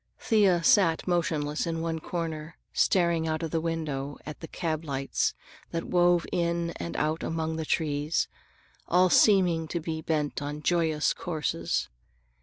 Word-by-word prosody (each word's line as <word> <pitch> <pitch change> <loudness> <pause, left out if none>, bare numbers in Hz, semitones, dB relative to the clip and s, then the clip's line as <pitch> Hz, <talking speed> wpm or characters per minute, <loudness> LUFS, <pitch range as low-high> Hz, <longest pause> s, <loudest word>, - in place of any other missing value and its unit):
Thea 195 -7 +3
sat 165 -1 +4
motionless 155 -4 0
in 165 -1 -2
one 165 0 -2
corner 160 -2 -5 0.2
staring 170 -3 +2
out 160 +1 -1
of 160 - -3
the 165 - 0
window 150 -4 -3
at 150 - -7
the 165 - -8
cab 160 -2 -3
lights 135 -3 -1 0.3
that 165 - -3
wove 175 -1 +3
in 170 0 0
and 85 0 -5
out 155 +2 0
among 160 0 -2
the 160 - -3
trees, 150 0 0 0.6
all 180 +1 +4
seeming 180 -6 +4
to 170 - -2
be 160 -1 -4
bent 150 -2 -1
upon 145 +1 -5
joyous 160 -3 +2
courses. 150 - -2
160 Hz, 150 wpm, -28 LUFS, 150-170 Hz, 0.6 s, sat